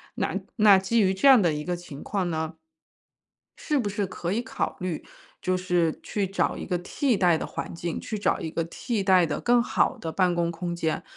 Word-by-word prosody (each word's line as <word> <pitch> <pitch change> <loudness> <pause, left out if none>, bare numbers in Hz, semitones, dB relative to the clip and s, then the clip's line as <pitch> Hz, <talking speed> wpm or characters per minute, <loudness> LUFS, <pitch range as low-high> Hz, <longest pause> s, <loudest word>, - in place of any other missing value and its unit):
那 - - -1 0.2
那 210 -2 +7
基 195 +5 +1
于 190 -2 +3
这 190 +9 +2
样 265 -5 +8
的 170 -4 +2
一 150 0 -3
个 180 +2 -2
情 170 -5 -10
况 190 -4 -1
呢， 160 0 -2 1.0
是 300 -2 -1
不 225 -6 -1
是 205 0 -2
可 180 -1 -4
以 235 +3 0
考 - - -3
虑 180 -3 -3 0.4
就 185 0 +1
是 175 -3 0
去 205 -2 -2
找 195 +2 0
一 - - -6
个 180 - 0
替 235 +8 0
代 175 -4 +4
的 - - -4
环 - - -6
境， 170 0 -4
去 215 - -4
找 - - +1
一 160 - -4
个 165 - -1
替 210 +6 -3
代 185 -2 +5
的 150 - -3
更 240 0 +3
好 - - +1
的 165 - -4
办 180 -2 +2
公 170 -1 0
空 170 +1 -4
间。 160 -2 -1
185 Hz, 235 characters per minute, -26 LUFS, 170-205 Hz, 1.0 s, 样